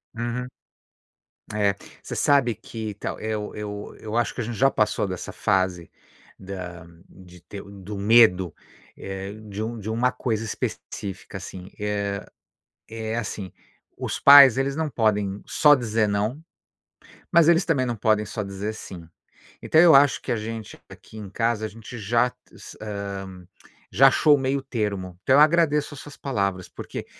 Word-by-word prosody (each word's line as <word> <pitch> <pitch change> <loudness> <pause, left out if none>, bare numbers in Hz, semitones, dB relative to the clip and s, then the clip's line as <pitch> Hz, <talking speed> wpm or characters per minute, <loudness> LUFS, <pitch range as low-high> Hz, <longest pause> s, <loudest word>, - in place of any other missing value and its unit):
Uhum. 120 +2 -3 1.1
É, 100 -2 +1 0.3
você - - -7
sabe 135 -5 +3
que 110 -2 -7
então, 100 - -6
eu 110 -1 -4
eu 105 -1 -7
eu 110 +1 -4
acho 120 - 0
que - - -4
a - - -2
gente 115 0 -5
já 135 +3 +4
passou 105 -1 +1
dessa 90 -2 -6
fase, 95 -3 0 0.5
da 90 -3 -8 0.2
de 90 -2 -16
ter 100 +3 -9
do 100 0 -9
medo, 100 -4 +4 0.4
eh, 95 +1 -6 0.2
de 100 +1 -5
um 115 +2 -4
de 105 +1 -6
uma 120 +3 +1
coisa 115 -3 -2
específica, 100 -2 -6
assim. 95 0 -9
Eh, 105 -1 -2 0.8
é 110 0 -4
assim, 100 -4 -5 0.5
os - - -4
pais, 140 -3 +9
eles 135 +1 0
não 160 0 -1
podem 105 -5 0
só 150 -2 +5
dizer 115 -4 0
não, 105 +8 -1 0.9
mas 170 -2 +5
eles 170 +1 +4
também 140 -6 +1
não 120 -1 -2
podem 105 0 +1
só 105 +1 -5
dizer 100 +2 -5
sim. 90 -6 -10 0.6
Então, 160 - +4
eu 170 -2 +7
acho 140 0 +5
que - - -7
a - - +1
gente, 110 0 -6
aqui - - -14
em 105 -3 -8
casa, 115 +1 -1
a - - -2
gente 110 +2 -11
já 115 +3 +2 0.3
s - - -12
hã, 100 -3 -6 0.4
já 135 +8 +6
achou 150 +3 +4
o - - -3
meio 135 +1 0
termo. 105 -8 -3
Então, 130 +6 +4
eu - - +7
agradeço 150 -2 +3
as 135 - -10
suas 145 - -11
palavras, 100 -8 -2
porque - - -8
110 Hz, 165 wpm, -24 LUFS, 100-125 Hz, 1.1 s, pais